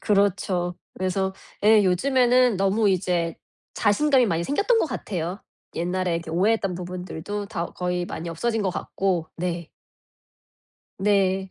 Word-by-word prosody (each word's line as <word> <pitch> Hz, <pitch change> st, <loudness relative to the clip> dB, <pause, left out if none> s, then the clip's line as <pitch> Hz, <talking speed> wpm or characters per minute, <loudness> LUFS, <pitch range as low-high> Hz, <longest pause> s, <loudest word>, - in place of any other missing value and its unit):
그렇죠. 195 Hz, -3 st, +1 dB, 0.2 s
그래서 190 Hz, +1 st, -1 dB, 0.3 s
예. 215 Hz, -1 st, +6 dB
요즘에는 250 Hz, +3 st, +3 dB
너무 195 Hz, +3 st, +2 dB
이제 175 Hz, -3 st, 0 dB, 0.4 s
자신감이 255 Hz, +4 st, +3 dB
많이 170 Hz, -3 st, 0 dB
생겼던 410 Hz, -, +2 dB
것 -, -, +2 dB
같아요. 190 Hz, -, -4 dB, 0.3 s
옛날에 180 Hz, +1 st, -1 dB
이렇게 165 Hz, -1 st, -6 dB
오해했던 195 Hz, +1 st, +1 dB
부분들도 180 Hz, +3 st, -5 dB
다 175 Hz, -5 st, -3 dB
거의 180 Hz, 0 st, -2 dB
많이 170 Hz, +1 st, -5 dB
없어진 220 Hz, +7 st, -1 dB
것 190 Hz, -, +1 dB
같고. 180 Hz, -2 st, -2 dB
네. 170 Hz, -1 st, -3 dB, 1.3 s
네. 195 Hz, -1 st, +2 dB
190 Hz, 285 characters per minute, -24 LUFS, 175-210 Hz, 1.3 s, 예